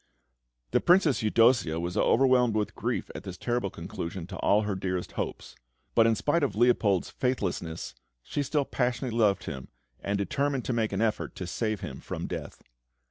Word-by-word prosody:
The - - +3
Princess 175 -6 +4
Eudossia 115 -6 +3
was 85 +2 -3
overwhelmed 125 0 +4
with 105 -1 -1
grief - - -3
at - - -6
this 90 -1 -8
terrible 120 -2 -1
conclusion 85 -1 -6
to 95 +1 -8
all 105 +2 +3
her 105 -1 -1
dearest 95 -1 -3
hopes; - - -5 0.4
but, 115 - +5
in 115 - +3
spite 150 +8 +1
of 140 - 0
Leopold's 110 -5 +3
faithlessness, 90 -10 -2 0.3
she 145 - -2
still 145 0 0
passionately 125 -2 -1
loved 105 -4 +3
him, 65 -1 -6 0.3
and 100 0 -1
determined 135 +7 -1
to 125 - -1
make 115 -2 0
an 100 +1 -1
effort 110 -1 -1
to 90 - -5
save 110 +4 -2
him - - -6
from - - -5
death. - - -6
110 Hz, 175 wpm, -28 LUFS, 95-125 Hz, 0.4 s, but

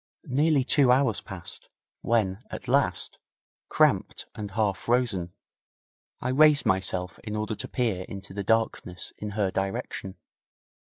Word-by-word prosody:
Nearly 145 +1 +2
two 135 -1 +4
hours 125 -4 +2
passed, 95 -5 -7 0.3
when, 110 -2 0
at - - -7
last, 125 -9 +2 0.5
cramped - - +2
and 105 -1 -6
half 100 -1 0
frozen, 115 -8 0 0.9
I 125 - -2
raised 145 +2 +5
myself 95 -2 +1
in 105 -1 -5
order 110 +1 -2
to - - -5
peer 110 -8 -1
into 100 -1 -8
the 100 0 -3
darkness 110 -4 -1
in 105 - -4
her 100 -3 +1
direction. 95 0 -3
105 Hz, 130 wpm, -27 LUFS, 95-125 Hz, 0.9 s, raised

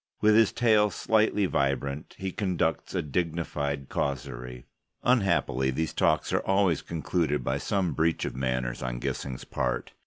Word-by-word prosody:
With 105 0 +5
his 110 -1 +5
tail 110 -3 +4
slightly 105 +1 +2
vibrant, 70 -2 -1
he 95 0 -3
conducts 90 -5 -1
a - - 0
dignified 75 -3 -2
causerie. 60 -2 -4 0.4
Unhappily, 100 - +2
these 80 +5 -1
talks 80 - +1
are - - +3
always 95 -4 +2
concluded 80 -4 -1
by 65 +3 -1
some 95 -1 0
breach 80 +1 +1
of - - -4
manners 65 -2 -2
on 60 -2 -3
Gissing's 65 0 -4
part. - - -2
80 Hz, 145 wpm, -28 LUFS, 65-95 Hz, 0.4 s, With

